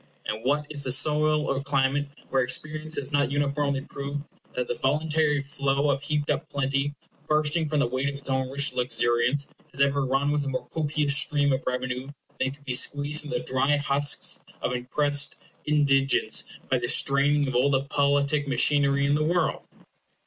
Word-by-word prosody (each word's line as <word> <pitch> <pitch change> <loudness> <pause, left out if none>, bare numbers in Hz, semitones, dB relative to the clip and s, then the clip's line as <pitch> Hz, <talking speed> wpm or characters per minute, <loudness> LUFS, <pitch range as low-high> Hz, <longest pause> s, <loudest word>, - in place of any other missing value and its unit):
And 110 +1 -4
what 145 +3 +1
is 145 -2 -1
the 130 - -1
soil 150 +2 +3
or 135 0 -1
climate 140 0 0 0.2
where 135 - +3
experience 155 +5 -1
has 140 0 -3
not 145 -1 +1
uniformly 140 -1 0
proved 140 0 -6 0.3
that 125 -1 -2
the - - -1
voluntary 150 +1 +1
flow 140 +1 0
of 135 0 -2
heaped 150 0 -1
up 150 +3 -3
plenty, 140 +1 -1 0.3
bursting 155 +1 +1
from 150 0 -1
the - - +3
weight 130 +3 -1
of 140 - -6
its 140 0 -7
own 130 -1 -1
rich 140 0 +1
luxuriance, 125 +2 +1 0.2
has 135 - -10
ever 140 0 +2
run 135 +2 0
with 150 -1 0
a - - -5
more 130 -1 -3
copious 150 -2 0
stream 145 -1 +2
of 130 - -1
revenue 125 +1 -3 0.3
than 130 - +1
could 140 +1 -12
be 130 - -2
squeezed 145 +4 +2
from 150 - -8
the 165 +1 -2
dry 135 0 +1
husks 145 0 0 0.2
of - - 0
oppressed 145 +3 0 0.3
indigence 140 -3 +2 0.2
by 130 - +1
the 120 - -2
straining 140 +3 +3
of 130 - -3
all 125 +3 +3
the 135 -1 +1
politic 140 +1 +1
machinery 140 0 +3
in 140 - +2
the 150 +1 +1
world? 170 +1 0
140 Hz, 185 wpm, -26 LUFS, 135-150 Hz, 0.3 s, soil